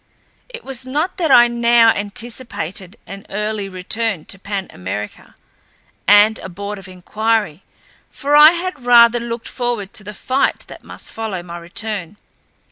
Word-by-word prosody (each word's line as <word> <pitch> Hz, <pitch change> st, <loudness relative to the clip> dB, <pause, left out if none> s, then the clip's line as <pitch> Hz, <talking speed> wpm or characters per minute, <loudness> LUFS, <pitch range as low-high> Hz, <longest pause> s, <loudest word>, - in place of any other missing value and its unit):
It 480 Hz, -1 st, -10 dB
was 265 Hz, -2 st, -4 dB
not 300 Hz, +9 st, -2 dB
that 335 Hz, -4 st, 0 dB
I 240 Hz, -2 st, +7 dB
now 235 Hz, -1 st, +4 dB
anticipated 205 Hz, -3 st, -5 dB
an 195 Hz, 0 st, -9 dB
early 210 Hz, 0 st, -3 dB
return 185 Hz, 0 st, -3 dB
to 195 Hz, -, -17 dB
Pan 195 Hz, -1 st, -4 dB
America 95 Hz, +3 st, -7 dB, 0.7 s
and 205 Hz, +2 st, +6 dB
a -, -, -8 dB
board 200 Hz, +3 st, -6 dB
of 195 Hz, -, -10 dB
inquiry, 205 Hz, -1 st, -2 dB, 0.5 s
for 290 Hz, +1 st, -1 dB
I 305 Hz, +2 st, +9 dB
had 350 Hz, -6 st, -4 dB
rather 240 Hz, -1 st, +6 dB
looked 235 Hz, 0 st, -5 dB
forward 240 Hz, -6 st, -3 dB
to 210 Hz, -, -6 dB
the 210 Hz, +1 st, -9 dB
fight 260 Hz, +6 st, 0 dB
that -, -, -13 dB
must -, -, -7 dB
follow 215 Hz, -6 st, -4 dB
my 175 Hz, 0 st, -8 dB
return. 200 Hz, 0 st, -4 dB
220 Hz, 150 wpm, -18 LUFS, 195-240 Hz, 0.7 s, I